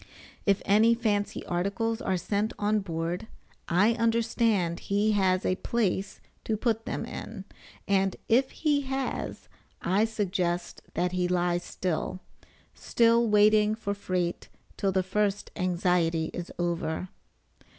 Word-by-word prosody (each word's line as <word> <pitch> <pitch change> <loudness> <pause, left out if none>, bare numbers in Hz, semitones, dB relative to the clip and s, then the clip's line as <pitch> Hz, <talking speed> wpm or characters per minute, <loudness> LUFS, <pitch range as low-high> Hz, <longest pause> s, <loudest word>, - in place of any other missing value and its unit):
If 200 -1 +3
any 220 +3 +5
fancy 210 -3 -1
articles 200 +6 -1
are 190 -1 0
sent 205 +5 -1
on 210 +1 +1
board, 170 0 -3 0.4
I 190 +6 +4
understand 225 -6 +1
he 205 +2 +1
has 190 -3 +2
a 185 - +1
place 200 -4 -1 0.2
to 220 - -1
put 225 0 -1
them - - -3
in, - - -7 0.4
and 195 -1 +2
if 260 +4 +3
he 295 -2 +1
has 270 0 -3 0.3
I 195 +5 +2
suggest 185 -5 -2
that 180 +1 +1
he 180 -1 0
lies 175 -1 +1
still, 185 +1 -3 0.5
still 235 0 +3
waiting 210 0 +5
for 200 -2 -3
freight 180 -3 -2 0.3
till 195 - 0
the 190 0 +1
first 205 +1 -1
anxiety 175 -3 +1
is 175 - -5
over. 175 0 -2
200 Hz, 130 wpm, -28 LUFS, 180-220 Hz, 0.5 s, any